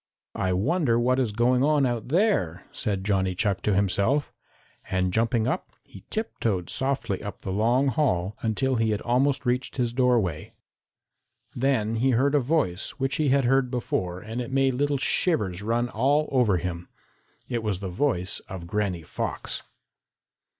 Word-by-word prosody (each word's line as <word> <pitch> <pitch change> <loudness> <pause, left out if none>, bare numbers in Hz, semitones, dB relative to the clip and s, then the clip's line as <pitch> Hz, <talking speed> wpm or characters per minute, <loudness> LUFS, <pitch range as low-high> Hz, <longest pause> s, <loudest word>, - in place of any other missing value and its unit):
"I 95 - -1
wonder 120 - +2
what 130 +2 +2
is 125 -5 +1
going 125 +4 +2
on 150 -1 +3
out 120 -3 -2
there," 135 - +1
said 100 -3 -2
Johnny 95 -2 +1
Chuck 100 0 0
to 105 - +1
himself, 100 +9 +1 0.6
and 95 -1 0
jumping 115 0 +1
up, - - -2
he 95 0 -14
tiptoed 110 - -2
softly 130 -7 -1
up 100 -1 -7
the 95 - -4
long 120 +7 +2
hall 105 - 0
until 125 +3 0
he 115 0 +1
had 105 -1 -1
almost 130 +3 +1
reached 125 +1 -1
his 120 -2 0
doorway. 120 - +1 1.0
Then 120 -4 0
he 130 +4 +2
heard 140 +3 +2
a 145 - +5
voice 130 - 0
which 135 +2 0
he 155 -3 +2
had 135 -1 +3
heard 135 0 +3
before, 95 -7 -2
and 110 +5 -5
it 120 - -5
made 135 -1 +2
little 145 +2 +1
shivers 105 - 0
run 115 +3 0
all 140 +7 +2
over 120 -8 +3
him. 85 0 -5 0.6
It 120 -1 -2
was 105 -4 -2
the 95 -2 -4
voice 90 -2 -1
of 95 -3 -6
Granny 95 -2 -2
Fox. - - -4
115 Hz, 165 wpm, -26 LUFS, 95-135 Hz, 1.0 s, a